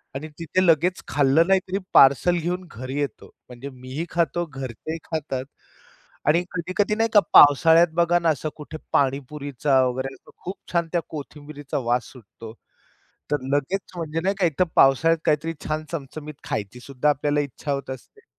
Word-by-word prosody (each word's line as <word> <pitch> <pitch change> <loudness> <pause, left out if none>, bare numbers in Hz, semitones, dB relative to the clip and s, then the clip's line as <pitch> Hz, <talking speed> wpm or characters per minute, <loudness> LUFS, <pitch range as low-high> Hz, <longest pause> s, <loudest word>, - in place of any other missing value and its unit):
आणि 150 +4 -5
तिथे 185 +3 0
लगेच 170 +2 +2
खाल्लं 145 +4 +3
नाही 195 0 +4
तरी 190 +1 -2 0.2
पार्सल 140 +6 +6
घेऊन 175 +2 -3
घरी 130 +5 -5
येतो. 145 - -4 0.2
म्हणजे 125 +3 -8
मीही 130 +5 -6
खातो, 170 0 0
घरचेही 135 +2 -6
खातात 140 -5 -4 0.8
आणि 170 +4 +4
कधी-कधी 185 +4 -1
नाही 225 +1 +1
का 205 - +8
पावसाळ्यात 160 +4 +7
बघा 170 0 +3
ना 170 - +1
असं 155 0 -1
कुठे 155 +1 -9 0.2
पाणीपुरीचा 140 0 +1
वगैरे 130 +2 -3
असं - - -18
खूप 185 +3 -5 0.2
छान 170 -1 +1
त्या 175 - +1
कोथिंबिरीचा 145 -1 -7
वास 120 +1 0
सुटतो. 115 -2 -12 0.8
तर 145 -3 0
लगेच 180 +8 -1
म्हणजे 165 -1 -3
नाही 195 +3 0
का 180 - +3
एक 160 -5 -2
तर 185 - +6
पावसाळ्यात 160 +5 +4
काहीतरी 155 +2 +1
छान 155 0 -2
चमचमीत 150 0 -6 0.2
खायचीसुद्धा 125 +7 -2
आपल्याला 145 0 +1
इच्छा 145 +1 -5
होत 140 -1 -3
असते. 420 - -12
150 Hz, 160 wpm, -23 LUFS, 135-170 Hz, 0.8 s, का